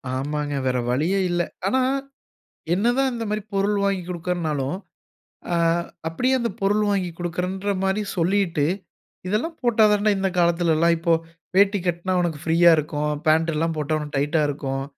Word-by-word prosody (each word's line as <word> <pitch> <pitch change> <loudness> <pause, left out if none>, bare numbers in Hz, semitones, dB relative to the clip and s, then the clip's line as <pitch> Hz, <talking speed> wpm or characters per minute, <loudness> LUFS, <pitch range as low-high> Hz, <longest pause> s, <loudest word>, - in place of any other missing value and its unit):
ஆமாங்க. 145 +2 -2
வேற 130 0 +1
வழியே 165 +10 +1
இல்ல. 175 0 +1 0.3
ஆனா, 260 +6 +2 0.9
என்னதான் 245 +7 +2
இந்த 230 -1 -4
மாரி, 210 0 -1
பொருள் 200 +1 +1
வாங்கிக் 190 -3 -1
குடுக்கிறேன்னாலும், 165 -4 -2 0.8
அ - - +2 0.5
அப்பிடியே 250 +11 +1
அந்த 235 -1 -1
பொருள் 205 +2 +2
வாங்கிக் 180 -4 -2
குடுக்கிறேன்ற 180 +3 -2
மாரி 190 +2 +1 0.2
சொல்லிட்டு, 175 -3 +1 0.6
இதெல்லாம் 245 - -1
போட்டா 230 -3 +3
தான்டா, 210 0 +3
இந்த 195 0 0
காலத்துலல்லாம் 170 -1 +3
இப்பொ, 170 0 +1 0.4
வேட்டி 200 +1 +5
கட்டினா 175 +2 -1
உனக்கு 165 -4 -2
ஃப்ரீயா 170 +1 +5
இருக்கும். 150 0 -1 0.2
பேண்ட் 160 +1 +3
எல்லாம் 165 +1 0
போட்டா, 155 +1 -1
உனக்கு 150 -1 -6
டைட்டா 150 +3 +1
இருக்கும். 135 -1 -3
175 Hz, 145 wpm, -23 LUFS, 155-200 Hz, 0.9 s, வேட்டி